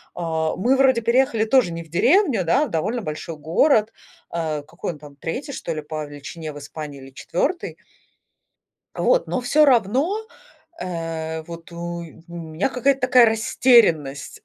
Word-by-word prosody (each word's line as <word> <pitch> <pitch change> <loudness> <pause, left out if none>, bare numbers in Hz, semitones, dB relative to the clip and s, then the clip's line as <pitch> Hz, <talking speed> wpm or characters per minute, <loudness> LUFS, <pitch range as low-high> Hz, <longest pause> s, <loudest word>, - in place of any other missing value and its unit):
А, 160 -2 -1
мы 245 +8 +3
вроде 260 -3 +4
переехали 235 -1 +2
тоже 245 -6 +3
не 165 0 -5
в 160 - -20
деревню, 250 - +3
да, 270 - +3
а - - -6
довольно 215 +9 -2
большой 155 +1 -5
город. 215 - +2 0.4
А 155 -3 -2
какой 170 +3 -6
он 150 - -14
там? 145 -2 -13
3, 250 - -5
что 165 - -4
ли, 155 - -4
по 155 0 -5
величине 145 +2 -8
в - - -10
Испании 145 -1 -8
или 135 0 -12
4? 260 - -2 1.2
А - - -3
вот, - - +3
но 255 - -1
всё 295 +5 +3
равно, 270 - +2 0.6
э, 165 -2 -4
вот 170 +1 -10
у 170 0 -5 0.3
меня 170 +4 -3
какая-то 270 +2 +1
такая 250 -1 +6
растерянность. 220 - +2
170 Hz, 160 wpm, -22 LUFS, 160-250 Hz, 1.2 s, такая